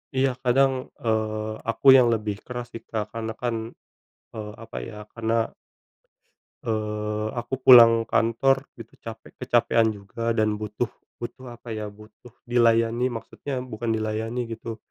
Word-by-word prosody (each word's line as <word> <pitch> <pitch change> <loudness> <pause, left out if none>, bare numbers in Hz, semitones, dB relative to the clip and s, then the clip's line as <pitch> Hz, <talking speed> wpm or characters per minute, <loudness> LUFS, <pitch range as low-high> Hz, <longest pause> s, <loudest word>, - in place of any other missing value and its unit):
Iya, 130 -1 +1
kadang, 130 +1 +2 0.2
eee, 110 -1 -1
aku 135 +4 +6
yang 130 -2 +7
lebih 105 -3 -1
keras 120 -1 -7
sih 115 - -7
Kak, 110 -2 -5
karena 110 -1 -4
kan, 120 -1 -2 0.8
eee, 105 -1 -6
apa 115 0 -9
ya 105 -1 -8
karena, 115 0 +1 1.2
eee, 105 -1 -2
aku 120 +2 -5
pulang 115 -3 +9
kantor 135 +4 +2
gitu 115 -1 -12
capek 115 0 -8
kecapekan 115 -2 +2
juga 115 +4 -3
dan 110 -2 +1
butuh 110 +3 -3 0.3
butuh 125 +1 -7
apa 120 0 -12
ya, 110 -1 -4
butuh 110 +3 -16 0.2
dilayani 115 +1 +3
maksudnya 115 +4 -6
bukan 120 -2 -5
dilayani 110 +2 -2
gitu, 115 0 -6
115 Hz, 135 wpm, -25 LUFS, 110-120 Hz, 1.2 s, pulang